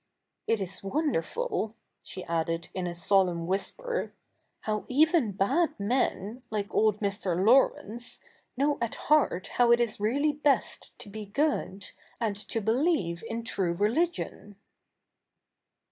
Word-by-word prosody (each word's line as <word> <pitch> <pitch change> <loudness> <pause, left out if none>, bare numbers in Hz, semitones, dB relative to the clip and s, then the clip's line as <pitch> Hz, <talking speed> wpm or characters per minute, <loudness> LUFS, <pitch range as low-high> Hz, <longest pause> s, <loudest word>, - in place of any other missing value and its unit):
It 225 - +2
is 190 -1 -4
wonderful,' 285 - -1 0.3
she 185 - -7
added 165 0 -2
in 185 -1 -2
a 175 - -4
solemn 175 -1 +2
whisper, 480 - -2 0.2
' - - -45
how 215 -1 -2
even 300 - +3
bad 205 - +1
men, 220 0 0
like 205 -2 -3
old 215 -1 +3
Mr. 200 -4 0
Laurence, 240 -1 +2 0.4
know 285 +2 +1
at 235 -2 -1
heart 295 - +2 0.2
how 240 -1 +6
it 235 - +6
is 235 -3 0
really 275 +9 +2
best 290 -3 0
to - - -9
be 210 +1 -7
good, 205 -6 -1 0.3
and 220 -4 0
to 215 +2 -3
believe 220 - +1
in 230 0 -3
true 190 -6 -1
religion.' 220 - -1
215 Hz, 130 wpm, -28 LUFS, 195-270 Hz, 0.4 s, how